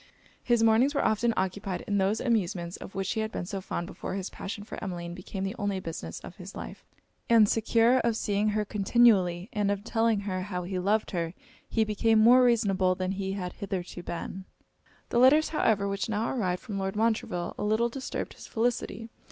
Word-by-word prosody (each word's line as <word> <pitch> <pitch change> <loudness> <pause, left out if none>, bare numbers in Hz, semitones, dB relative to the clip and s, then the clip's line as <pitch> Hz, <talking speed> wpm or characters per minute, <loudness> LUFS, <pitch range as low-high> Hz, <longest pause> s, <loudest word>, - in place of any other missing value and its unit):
His 240 -2 +2
mornings 230 +6 +4
were - - +1
often 225 +2 +2
occupied 190 0 -2
in 205 -1 -1
those 195 +3 +1
amusements 190 -7 -1
of - - -10
which 195 0 -1
he 225 - -1
had 220 0 -2
been 175 - -4
so 195 +1 -4
fond 175 -2 -4
before 190 0 -6
his 195 -1 -4
passion 205 +1 -6
for 215 - -8
Emmeline 175 -3 -5
became 190 +2 -6
the 195 +3 -3
only 200 -2 -1
business 160 - -6
of - - -11
his - - -10
life; - - -8 0.5
and 225 -3 +7
secure 230 +3 +3
of 230 -2 +1
seeing 205 0 0
her 210 0 0
continually, 195 -4 +3
and 205 -2 +1
of 200 0 -1
telling 225 -2 +1
how 185 -2 -3
he 185 +1 -3
loved 210 +4 +1
her, 170 -2 -2 0.3
he 225 - +2
became 220 +1 +2
more 240 +4 +7
reasonable 195 -6 +3
than 185 0 -2
he 195 0 -3
had 180 -3 -4
hitherto 185 -3 -5
been. 185 +2 -6 0.6
The 235 - +2
letters, 285 +5 +6
however, 215 -10 +1
which 200 +2 -2
now 220 +1 -1
arrived 185 -8 -1
from 200 -3 -4
Lord 195 +1 -2
Montreville, 215 -5 0
a - - -2
little 220 +3 +2
disturbed 260 +3 -5
his - - -12
felicity. 230 -1 -2
205 Hz, 195 wpm, -28 LUFS, 185-225 Hz, 0.6 s, and